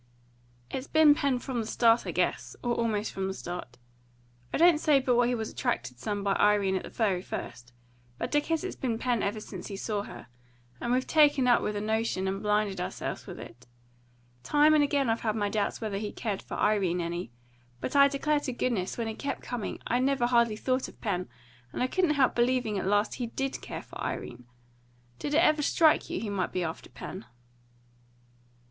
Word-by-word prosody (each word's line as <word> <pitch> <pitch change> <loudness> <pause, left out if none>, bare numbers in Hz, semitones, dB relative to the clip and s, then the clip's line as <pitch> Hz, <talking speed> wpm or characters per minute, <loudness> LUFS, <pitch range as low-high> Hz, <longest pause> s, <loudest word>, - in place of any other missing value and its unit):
"It's 265 +1 -4
been 315 -2 +6
Pen 280 -3 +1
from 245 -1 -4
the 220 - -5
start, 230 0 +3
I - - -1
guess, - - -1
or 240 -1 +1
almost 225 -2 -1
from 190 0 -3
the 190 - -4
start. 175 -11 -7 0.7
I - - 0
don't 340 -2 +6
say 300 -3 +4
but 255 -2 +1
what 240 0 +4
he 250 - +1
was 220 -2 -4
attracted 130 - -2
some 205 - -3
by 200 -1 +2
Irene 205 -2 +3
at 190 - -1
the - - -9
very 195 -6 0
first; 120 -8 -7 0.5
but - - -3
I - - +6
guess 325 +2 -1
it's 375 - -4
been 235 -4 -2
Pen 240 -2 0
ever 205 +2 -1
since 190 -4 -8
he 200 - -6
saw 205 +1 -2
her; - - -9 0.5
and 240 - -2
we've 255 +1 +2
taken 295 -4 +4
up 245 - +5
with 210 - -2
a 205 - -2
notion, 220 -3 0
and 195 +1 -2
blinded 210 -3 0
ourselves - - -5
with - - -8
it. 120 +2 -12 0.7
Time 295 - +4
and 300 -1 +5
again 280 -2 +1
I've 225 0 0
had 220 -2 0
my 205 -2 0
doubts 205 +1 -1
whether 210 -3 -2
he 210 0 -4
cared 210 -4 -3
for - - -7
Irene 195 -4 +2
any; 170 -5 -3 0.5
but 255 - -4
I 280 0 +8
declare 290 +2 +1
to 265 -3 -4
goodness, 230 -7 -1
when 230 -1 -2
he 220 - -3
kept 280 +5 -4
coming, 245 -4 -4
I 245 - +1
never 265 -1 +2
hardly 235 -2 +3
thought 255 +3 0
of - - -15
Pen, 185 -5 -2 0.4
and - - -2
I - - +3
couldn't 315 +3 +1
help 265 -3 +3
believing 240 -4 +1
at 185 - -3
last 205 +1 +2
he 240 - -1
DID 270 +3 -3
care - - -6
for - - -8
Irene. 120 0 -5 0.7
Did 290 - -2
it 330 - +5
ever 305 -3 +4
strike 315 +2 +3
you - - -2
he 215 -2 -4
might 190 -3 -1
be 180 - -1
after 160 0 -5
Pen?" 190 - -8
225 Hz, 210 wpm, -29 LUFS, 200-265 Hz, 0.7 s, I